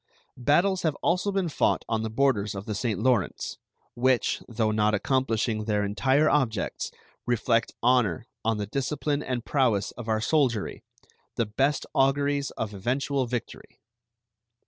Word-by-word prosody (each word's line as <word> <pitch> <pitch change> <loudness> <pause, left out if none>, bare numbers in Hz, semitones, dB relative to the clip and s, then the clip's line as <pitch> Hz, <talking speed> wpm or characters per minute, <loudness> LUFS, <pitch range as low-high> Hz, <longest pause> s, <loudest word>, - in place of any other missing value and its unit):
Battles 175 +9 +3
have 155 -3 0
also 180 +4 +1
been 195 -2 0
fought 155 - +1
on 115 -1 0
the 110 - -2
borders 110 -5 +1
of 95 +1 -6
the 110 - -3
St. 105 -1 -1
Lawrence, 120 -5 0 0.3
which, 125 0 +1
though 110 -2 0
not 105 0 +2
accomplishing 115 -2 0
their 105 -1 +1
entire 130 +9 +2
objects, 125 -9 0 0.4
reflect 115 -1 +1
honor 120 -8 +2 0.2
on 115 -1 +1
the 105 - -2
discipline 140 +5 -1
and 125 -4 -3
prowess 120 -8 +1
of 120 -1 -9
our 110 0 +2
soldiery, 120 -3 0 0.5
the 115 - +1
best 135 +7 0
auguries 140 +1 +2
of 105 -2 -3
eventual 130 +6 -1
victory. 120 -2 -6
120 Hz, 145 wpm, -27 LUFS, 110-140 Hz, 0.5 s, Battles